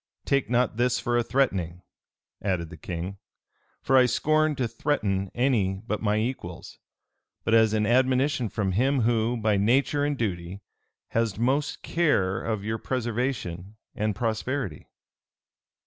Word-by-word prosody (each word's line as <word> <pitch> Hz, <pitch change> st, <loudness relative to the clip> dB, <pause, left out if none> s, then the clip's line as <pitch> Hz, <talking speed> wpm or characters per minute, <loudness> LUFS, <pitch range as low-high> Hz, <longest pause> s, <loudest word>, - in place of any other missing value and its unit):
Take 140 Hz, -5 st, +1 dB
not 125 Hz, -2 st, +1 dB
this 125 Hz, +1 st, +2 dB
for 120 Hz, -, -1 dB
a 120 Hz, -, +4 dB
threatening," 95 Hz, -10 st, 0 dB, 0.6 s
added 90 Hz, -4 st, -2 dB
the -, -, -8 dB
king, 90 Hz, +5 st, -6 dB, 0.6 s
"for 135 Hz, -, +2 dB
I 130 Hz, -1 st, +7 dB
scorn 155 Hz, +3 st, +2 dB
to 130 Hz, -3 st, -1 dB
threaten 110 Hz, -6 st, -1 dB
any 105 Hz, -6 st, +1 dB
but 105 Hz, -2 st, -2 dB
my 105 Hz, -1 st, +1 dB
equals; 110 Hz, -7 st, -4 dB, 0.6 s
but 115 Hz, -, 0 dB
as 110 Hz, -1 st, +5 dB
an 105 Hz, -1 st, +2 dB
admonition 130 Hz, +1 st, +2 dB
from 100 Hz, -2 st, -1 dB
him 130 Hz, +7 st, +2 dB
who, 115 Hz, +1 st, +1 dB
by 110 Hz, -2 st, +1 dB
nature 135 Hz, +7 st, +2 dB
and 145 Hz, -1 st, 0 dB
duty, 95 Hz, -3 st, -3 dB, 0.5 s
has 115 Hz, -3 st, 0 dB
most 140 Hz, +5 st, 0 dB
care 100 Hz, -, +1 dB
of 110 Hz, -3 st, -2 dB
your 110 Hz, +1 st, -2 dB
preservation 115 Hz, -6 st, -3 dB, 0.2 s
and 105 Hz, -1 st, -1 dB
prosperity." 115 Hz, -, -2 dB
115 Hz, 140 wpm, -26 LUFS, 100-130 Hz, 0.6 s, I